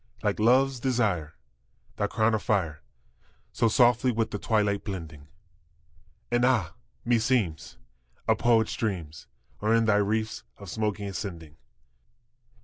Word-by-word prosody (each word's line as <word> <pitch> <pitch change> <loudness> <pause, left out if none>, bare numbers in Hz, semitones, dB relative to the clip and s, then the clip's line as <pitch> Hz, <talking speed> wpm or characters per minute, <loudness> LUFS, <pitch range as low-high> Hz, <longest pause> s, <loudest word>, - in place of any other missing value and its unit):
Like - - 0
love's 130 +4 +3
desire, 105 - 0 0.6
thy - - 0
crown 110 +1 +1
of 110 - 0
fire 85 -9 -1 0.7
So 115 - +1
softly 120 +2 +4
with 115 -1 -1
the 105 - -4
twilight 105 -2 +1
blending, 80 -8 -7 1.0
And 120 0 +2
ah! 115 -10 +2 0.3
meseems, 115 -9 0 0.5
a - - +4
poet's 115 -2 +2
dreams 85 -9 -4 0.3
Are 110 +2 +3
in 115 0 +3
thy 110 -2 +3
wreaths 110 +2 -1 0.2
of 100 -3 -9
smoke 105 -2 -1
ascending. 90 -6 -6
110 Hz, 125 wpm, -27 LUFS, 90-115 Hz, 1.0 s, softly